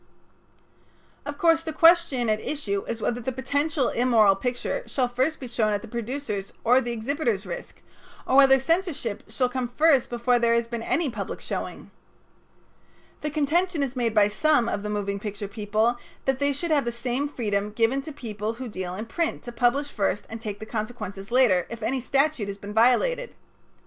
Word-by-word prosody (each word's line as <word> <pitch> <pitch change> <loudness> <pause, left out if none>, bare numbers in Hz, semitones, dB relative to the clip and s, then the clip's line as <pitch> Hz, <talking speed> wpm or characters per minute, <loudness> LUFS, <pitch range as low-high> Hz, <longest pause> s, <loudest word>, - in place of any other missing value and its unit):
Of 290 0 -5
course 330 0 +4
the 325 -1 -4
question 330 -6 +4
at 215 0 +1
issue 200 -10 -2
is 230 -1 -4
whether 240 +1 -1
the 260 - -2
potential 285 +2 0
immoral 225 -5 +4
picture 245 - -2
shall 255 -3 0
first 260 +6 -1
be 255 - -6
shown 220 -3 0
at 205 - -2
the - - -8
producer's 235 -3 -4
or 250 +3 +5
the 240 - -3
exhibitor's 235 -3 -1
risk, 175 -2 -8 0.4
or 260 - +1
whether 270 -1 +8
censorship 270 - -1
shall 250 +3 +1
come 250 0 -2
first 280 +1 +3
before 240 +1 +2
there 235 0 +3
has 235 0 +1
been 235 -1 -4
any 295 +4 0
public 205 -4 -5
showing. - - -6 1.3
The 300 - -2
contention 310 +2 +1
is 270 -1 -3
made 235 -3 0
by 205 -1 +6
some 245 +3 +2
of 205 - -2
the 210 - -4
moving 200 -1 -2
picture 205 -1 -5
people 215 +4 0 0.3
that 270 -1 +1
they 285 0 +2
should 315 +5 -3
have 285 -4 +3
the 240 - -1
same 245 +4 -2
freedom 210 -6 -2
given 230 +5 +1
to 310 - -8
people 220 -5 -4
who 250 +2 -7
deal 185 -3 -5
in 215 +4 -5
print 330 +8 -2
to 240 - -7
publish 250 +5 +1
first 205 -1 -1
and 225 0 -6
take 210 -3 -5
the 220 - -8
consequences 215 -3 -5
later 235 -8 +4
if 230 -1 -7
any 260 +4 0
statute 275 -2 +1
has 200 0 -5
been 205 +1 -8
violated. 470 - +2
240 Hz, 190 wpm, -25 LUFS, 215-280 Hz, 1.3 s, whether